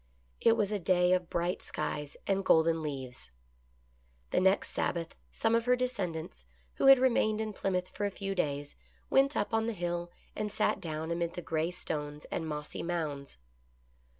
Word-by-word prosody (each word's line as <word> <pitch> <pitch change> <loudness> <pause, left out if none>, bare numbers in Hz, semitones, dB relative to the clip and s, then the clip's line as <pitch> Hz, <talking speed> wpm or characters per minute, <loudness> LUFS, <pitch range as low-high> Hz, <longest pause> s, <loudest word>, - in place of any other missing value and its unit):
It 230 0 +4
was 210 -1 +1
a 210 - 0
day 180 0 +3
of 180 -2 0
bright 175 +1 -1
skies 150 -1 -4
and 195 0 +1
golden 165 -2 +4
leaves. 130 - -6 1.0
The - - +3
next 190 +1 +3
Sabbath 165 -1 -2 0.2
some 225 0 +1
of 230 0 +2
her 250 0 +5
descendants, 175 - -3 0.3
who - - +3
had 270 0 +10
remained 235 -4 +2
in 220 -1 -2
Plymouth 185 -2 -1
for 205 - -2
a - - -1
few 195 0 -4
days, 145 -5 -2 0.4
went 275 +1 +4
up 205 - -1
on 225 0 +2
the 230 - -1
Hill 175 -2 -3 0.3
and 210 -1 -2
sat - - +1
down 160 0 -4
amid 170 0 -1
the 175 - -5
gray 160 +1 0
stones 150 -4 -4
and 160 - -2
mossy 150 -1 -4
mounds. 155 - -3
175 Hz, 175 wpm, -31 LUFS, 160-210 Hz, 1.0 s, had